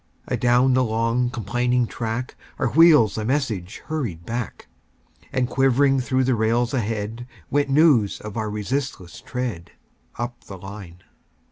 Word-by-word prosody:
Adown 125 +2 +3
the 130 0 +3
long, 115 +2 0
complaining 120 +1 0
track, 115 +2 -4 0.2
Our 130 - 0
wheels 150 -9 +5
a - - -2
message 110 -7 -2
hurried 120 - -4
back; 120 +2 -5 0.6
And 130 -2 0
quivering 135 +1 +3
through 130 +1 +1
the 130 0 +2
rails 115 +2 +1
ahead, 115 0 -3 0.2
Went 145 0 +1
news 135 -8 +4
of 105 -1 -8
our 110 -2 -2
resistless 105 -3 -4
tread, 120 -10 -5 0.4
Up 120 0 -5
the 95 - -9
line. 95 -2 -10
120 Hz, 135 wpm, -23 LUFS, 105-130 Hz, 0.6 s, wheels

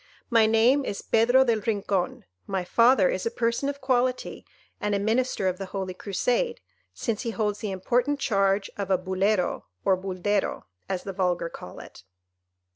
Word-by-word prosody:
My 225 -2 +5
name 235 +6 +4
is 200 - -4
Pedro 245 +4 +4
del 230 -3 +2
Rincon, 200 -4 -1 0.2
my 190 -2 -1
father 230 +1 +4
is 185 - -1
a - - +1
person 235 +3 -1
of 285 0 -6
quality, 255 -1 -1 0.3
and 210 0 0
a - - 0
Minister 220 -1 0
of 185 0 -1
the 195 - -5
Holy 190 -1 -4
Crusade, 250 - -1 0.3
since 225 -3 -3
he 235 - -3
holds 210 -2 -1
the 215 - -3
important 245 +9 0
charge 195 -4 +1
of 200 -1 -3
a 190 - +4
Bulero 185 +1 0 0.2
or 190 - +4
Buldero, 190 +2 -2 0.3
as 185 -2 -2
the 195 - -5
vulgar 180 -3 0
call 90 - -10
it. - - -12
210 Hz, 170 wpm, -26 LUFS, 190-240 Hz, 0.3 s, My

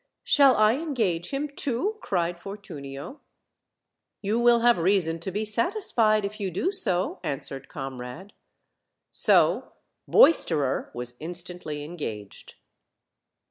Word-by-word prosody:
"Shall 275 -3 +5
I 215 +3 +4
engage 225 - -1
him 280 +2 -2
too?" 285 - -2
cried 175 -2 -1
Fortunio. 175 - -8 1.0
"You 210 +4 0
will 240 -1 +5
have 240 -4 +4
reason 165 -2 +1
to 180 +3 -4
be 210 +3 -2
satisfied 220 - +1
if 205 +2 -6
you 195 -2 -2
do 190 - -1
so," 190 - -1
answered 135 -3 -5
Comrade. 135 +7 -7 0.8
So - - +2 0.3
Boisterer 160 - +4
was 120 0 -4
instantly 175 -3 -6
engaged. 115 - -7
190 Hz, 110 wpm, -26 LUFS, 155-235 Hz, 1.0 s, Shall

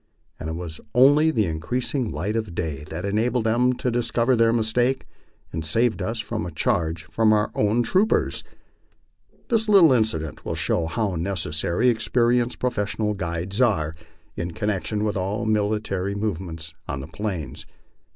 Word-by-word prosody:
And 80 - -5
it - - -3
was 85 -2 -6 0.2
only 145 +5 +6
the 115 -9 +1
increasing 120 - -2
light 85 +8 -2
of 110 -7 -3
day 75 -5 -3
that 80 +4 -6
enabled 110 +4 +1
them 120 +3 +3
to 125 0 -2
dis 120 0 +1
cover 120 +2 +2
their 115 -1 +4
mistake 120 +3 +1 0.5
and 80 0 -3
saved 105 +5 +1
us 110 +5 -2
from 110 0 -3
a 90 - -4
charge 80 -3 0
from 110 +8 +2
our 105 -1 +2
own 110 +3 +2
troopers. 190 - +1 1.1
This 225 -2 +2
little 180 -9 +7
incident 80 - 0
will 80 - -3
show 85 0 0
how 105 +3 -1
necessary 85 +3 0
experienced 120 +1 +2
professional 105 -3 -1
guides 90 +3 -3
are 80 -11 +2 0.4
u 85 - -3
connection 105 +2 -2
with 105 -1 -1
all 100 +4 -2
military 105 -2 0
movements 85 -6 -4
on 70 - -3
the 70 - -8
Plains. 90 -6 -5
105 Hz, 155 wpm, -24 LUFS, 85-120 Hz, 1.1 s, little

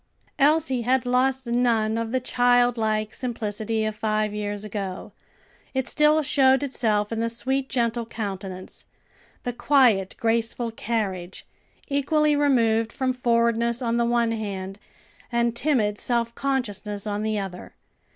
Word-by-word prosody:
Elsie 290 -3 +3
had 250 +1 +1
lost 260 +1 +1
none 235 -2 +1
of 230 0 -2
the 260 - +1
childlike 245 -4 +2
simplicity 220 -2 -2
of 215 0 -2
five 215 -1 -1
years 205 -1 -3
ago; 200 -3 -5 0.6
it 265 -1 0
still 300 +1 +3
showed 270 -1 +3
itself 215 -6 0
in 225 - -2
the 230 0 0
sweet, 265 +3 -2
gentle 235 -2 -1
countenance, 195 -4 -6 0.6
the 245 - -3
quiet 240 -8 +3
graceful 230 0 0
carriage, 200 -6 -3 0.4
equally 300 +2 +2
removed 230 -6 +2
from 260 -1 -1
forwardness 235 -1 +1
on 235 -2 0
the 235 - +2
one 235 -1 +1
hand, 195 -3 -5 0.5
and 235 -1 +1
timid 230 -7 +1
self 235 -1 0
consciousness 210 -7 -2
on 205 0 -2
the 215 0 -1
other. 190 -3 -6
235 Hz, 130 wpm, -24 LUFS, 215-255 Hz, 0.6 s, Elsie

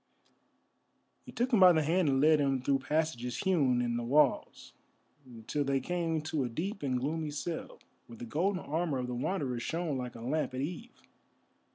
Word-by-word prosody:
He - - -8
took 245 +2 -1
him 220 - +5
by 185 -2 +8
the 160 -1 +2
hand 165 +1 +2
and 135 -1 +2
led 155 +1 +5
him 135 -2 +1
through 135 0 +2
passages 135 -4 -2
hewn 140 -10 +2
in 120 -1 -1
the 120 - -3
walls 140 +2 +1 0.7
till 145 +4 -1
they 135 -1 +1
came 165 +1 -2
to 155 -3 -1
a 125 - -2
deep 190 - -4
and 130 -3 -1
gloomy 155 +4 -2
cell, 150 +3 -5 0.3
where 115 - -11
the 120 - -7
golden 180 - -1
armour 160 -1 -1
of 125 - -2
the 125 - -4
Wanderer 130 -1 -2
shone 160 +1 -2
like 125 -1 -6
a 115 - -9
lamp 135 +2 -2
at 130 - -2
eve. 180 - -7
150 Hz, 190 wpm, -31 LUFS, 130-165 Hz, 0.7 s, by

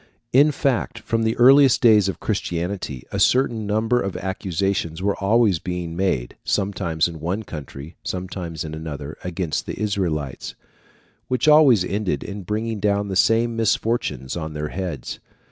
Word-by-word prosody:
In 145 +4 +6
fact, 135 -4 -1
from 115 0 -1
the 110 0 0
earliest 135 +1 +6
days 105 -5 +5
of - - -5
Christianity, 90 - -3
a - - -2
certain 120 -4 +2
number 110 +4 +1
of 100 -1 -3
accusations 95 -3 -2
were 100 +1 0
always 105 -3 +3
being 90 -2 -4
made, 85 -10 -1
sometimes 95 -5 0
in 85 -2 -8
one 90 +8 -2
country, 75 -2 -9
sometimes 90 -3 -5
in 80 -1 -6
another, 75 -2 -6
against 90 -2 -3
the - - -5
Israelites, 85 -10 -2 0.7
which 130 +2 0
always 145 - +6
ended 100 0 -2
in 100 0 -6
bringing 110 +3 -3
down 100 0 0
the 95 - -3
same 115 +4 +3
misfortunes 110 - -1
on 80 -2 -5
their 75 0 -4
heads. 90 -9 -5
95 Hz, 150 wpm, -22 LUFS, 85-110 Hz, 0.7 s, In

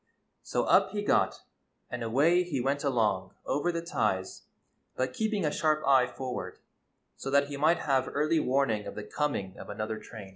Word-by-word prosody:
So - - -1
up - - +4
he 205 -1 -2
got, - - +1 0.5
and 125 - -4
away 145 +10 +3
he 175 -7 -2
went 135 +3 0
along 105 -9 0
over 160 +5 0
the 170 -1 -3
ties, 95 - -2 0.5
but 130 0 -1
keeping 215 - 0
a 150 - +1
sharp 155 0 +1
eye 130 -2 +5
forward 125 0 -5 0.6
so 135 - -5
that 140 +1 +3
he 145 - -5
might 160 +4 +3
have 135 -2 +1
early 155 +3 +2
warning 125 -7 +1
of - - -7
the 105 - -5
coming 105 -5 -2
of - - -9
another 110 +1 -4
train. 110 -3 -10
135 Hz, 180 wpm, -29 LUFS, 110-155 Hz, 0.6 s, eye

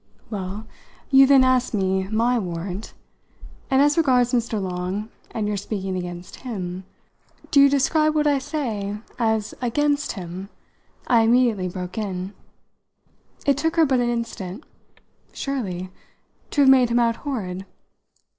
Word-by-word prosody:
"Well, 200 +1 -5 0.5
you 270 0 +8
then 270 -1 +6
asked 255 -2 +2
me 190 -1 0
my 230 +4 +1
warrant. 180 +2 -5 0.7
And 270 +1 +4
as 290 +2 +3
regards 250 -5 +3
Mr. 235 -3 0
Long 185 +3 -3 0.2
and 215 -2 -3
your 210 -1 -1
speaking 195 -1 -3
against 175 -1 -6
him 185 -7 -5 0.3
" - - -28
"Do 285 - +5
you 280 - +7
describe 305 +3 +2
what 300 -1 +2
I 290 -2 +3
say 235 -9 -3 0.2
as 220 -2 0
'against' 290 +4 0
him?" 185 0 -7 0.6
I 235 -2 +4
immediately 225 -5 +3
broke 180 +3 -5
in. 190 -2 -4 1.1
It 280 -1 +3
took 325 +2 0
her 325 -1 +5
but 265 -3 +2
an 240 0 +1
instant. 230 - -4 0.7
"Surely 190 -10 -4 0.6
to 290 - +1
have 270 - +6
made 255 -3 +5
him 235 - +1
out 230 -1 +2
horrid." 195 -10 -4
225 Hz, 145 wpm, -23 LUFS, 190-265 Hz, 1.1 s, you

